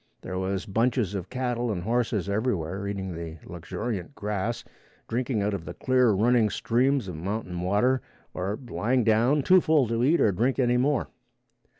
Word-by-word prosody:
There 95 0 -4
was 95 +1 -2
bunches 115 0 0
of 95 -3 -4
cattle 125 -2 -1
and 90 -4 -3
horses 115 -3 0
everywhere 100 -3 -1
eating 95 -2 -4
the 80 -1 -7
luxuriant 95 - -5
grass, 105 +2 -3 0.4
drinking 120 -2 -1
out 105 +1 0
of 95 -4 -4
the - - -7
clear 130 -2 +3
running 110 +2 +3
streams 125 +2 +1
of 90 - -5
mountain 90 +1 -4
water 105 +8 +2 0.3
or 95 +3 -2
lying 120 +2 +1
down 120 +6 +3
too 185 +4 +6
full 155 -6 +3
to 115 +1 0
eat 155 +6 +4
or 105 - +4
drink 120 +8 0
any 125 -2 +3
more. 135 +1 +1
110 Hz, 170 wpm, -26 LUFS, 95-125 Hz, 0.4 s, too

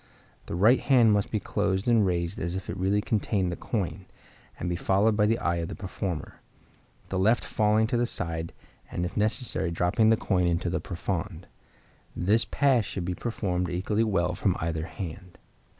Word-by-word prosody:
The - - -4
right 110 +8 +5
hand 120 -6 +4
must 100 -1 +1
be 110 - -1
closed 100 -1 -1
and 115 -3 +5
raised 85 -1 -1
as 85 +2 -2
if 95 - -4
it 95 - -6
really 100 +2 +1
contained 100 -4 0
the - - -3
coin, 95 -3 -3 0.5
and - - -3
be 90 - -1
followed 100 +5 +2
by 105 0 +3
the 115 +2 +2
eye 85 -5 0
of 85 -1 -2
the - - -6
performer; 95 -4 -5 0.7
the 95 - -1
left 110 +5 +3
falling 105 +1 +2
to 120 +2 0
the 120 0 +1
side, 85 -5 -3 0.4
and 90 - -2
if 90 - -6
necessary 110 -3 0
dropping 90 +6 +2
the 110 - +5
coin 90 -4 +1
into 85 0 0
the - - -1
profonde. 90 0 -4 0.7
This 105 +6 +2
pass 135 -5 +2
should 95 -3 -4
be 90 - -2
performed 90 -5 -2
equally 100 +5 0
well 90 -5 +1
from 90 0 0
either 80 0 -2
hand. 90 +1 -8
95 Hz, 185 wpm, -27 LUFS, 90-110 Hz, 0.7 s, right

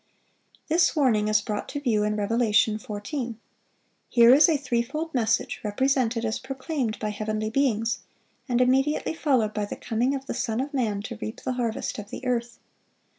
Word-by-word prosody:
This 330 +2 +3
warning 235 -8 +3
is 215 0 +3
brought 210 0 -4
to 285 - -4
view 235 -7 +1
in 210 0 0
Revelation 215 0 +2
14. 225 +3 -5 0.7
Here 235 0 +7
is 300 +5 +7
a 315 - +3
threefold 280 +5 -2
message 225 -3 0
represented 235 +1 +1
as 220 0 -1
proclaimed 265 -3 -3
by 215 - -3
heavenly 215 +1 -3
beings, 230 -3 +1 0.5
and 245 0 +2
immediately 270 +5 +2
followed 255 -10 +1
by 210 -1 -1
the - - -6
coming 245 +5 -1
of 270 -1 -6
the - - -4
Son 225 0 -2
of 280 +3 -3
man 215 -7 -1
"to 235 -1 -7
reap 220 - -5
the 255 - -1
harvest 235 -3 -2
of 205 0 -8
the 260 - -7
earth." 235 -1 -1
235 Hz, 175 wpm, -26 LUFS, 215-270 Hz, 0.7 s, Here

